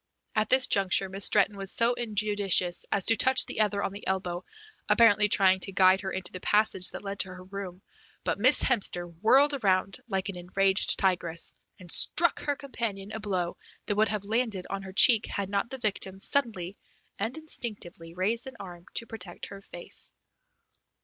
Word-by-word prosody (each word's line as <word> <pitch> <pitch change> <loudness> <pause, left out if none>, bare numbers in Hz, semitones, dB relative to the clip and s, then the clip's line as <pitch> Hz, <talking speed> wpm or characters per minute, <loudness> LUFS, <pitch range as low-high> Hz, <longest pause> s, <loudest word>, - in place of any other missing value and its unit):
At 215 0 0
this 260 0 +5
juncture 195 -1 +1
Miss 195 +1 +3
Stretton 205 0 +3
was 195 -1 -2
so 235 +1 +2
injudicious 205 -6 +1
as 195 - 0
to 225 - +5
touch 260 +4 +4
the - - -7
other 205 -1 0
on - - -2
the 200 - -10
elbow, 185 -2 -3 0.5
apparently 210 -2 +4
trying 190 -1 +3
to 195 - -4
guide 190 0 +4
her 190 - -4
into 190 -1 -5
the 185 - -7
passage 210 -2 +2
that - - -9
led 200 0 -6
to 190 - 0
her 185 - -12
room, 190 -1 -9 0.4
but - - -2
Miss 255 +6 +4
Hemster 180 -6 -1 0.2
whirled 275 +7 +4
around 195 -6 0
like 190 -3 -2
an 190 - -6
enraged 190 +2 0
tigress, 175 -4 -1 0.3
and 180 -2 -8
struck 340 +1 +4
her 290 -1 -2
companion 225 -8 -6
a 220 - -6
blow 185 -5 -3 0.3
that 205 - -2
would 215 +1 +2
have 210 -1 -3
landed 220 -3 -2
on 195 0 -4
her 190 -1 -9
cheek 225 +3 +5
had 200 -1 -4
not 200 +3 -1
the 265 - -6
victim 195 -4 -3
suddenly 205 -8 -1 0.4
and 225 +8 -2
instinctively 205 - -4
raised 220 +7 0
an 260 - -10
arm 175 -3 -11
to 230 - +1
protect 200 -6 -7
her 200 0 -11
face. 175 -3 +2
200 Hz, 185 wpm, -27 LUFS, 185-220 Hz, 0.5 s, this